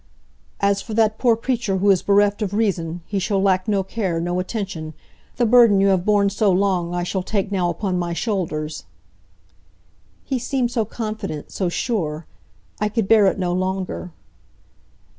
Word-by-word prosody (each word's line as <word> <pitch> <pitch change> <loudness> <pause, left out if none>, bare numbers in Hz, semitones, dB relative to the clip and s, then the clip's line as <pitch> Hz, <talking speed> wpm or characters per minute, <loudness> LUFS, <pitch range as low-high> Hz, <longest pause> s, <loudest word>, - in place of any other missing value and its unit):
"As 200 0 +2
for 220 - -6
that 220 -1 +2
poor 240 -3 +4
creature 230 -5 -1
who 200 +2 +4
is 185 - +2
bereft 205 +1 +2
of 205 -1 -2
reason, 175 -6 -1
he 200 - -2
shall 195 +1 0
lack 190 0 +2
no 200 -2 +1
care, 190 -4 -2
no 175 +2 -1
attention. 185 -6 -4 0.4
The 240 - +1
burden 230 -3 +6
you 195 0 +4
have 185 -2 +1
borne 205 -1 +3
so 210 0 +2
long 180 -2 +1
I 175 - -1
shall 185 +2 -2
take 200 +1 -2
now 180 -3 +1
upon 180 +1 -2
my 175 -1 -2
shoulders." 165 -7 -3 1.4
He 265 -2 -2
seemed 245 0 -1
so 230 -3 0
confident, 215 -9 -5
so 185 -3 -1
sure. 170 -7 -2 0.5
I 210 0 0
could 215 -2 -1
bear 215 -2 +6
it 190 - +1
no 180 -2 -1
longer. 185 -1 -3
195 Hz, 170 wpm, -21 LUFS, 180-215 Hz, 1.4 s, burden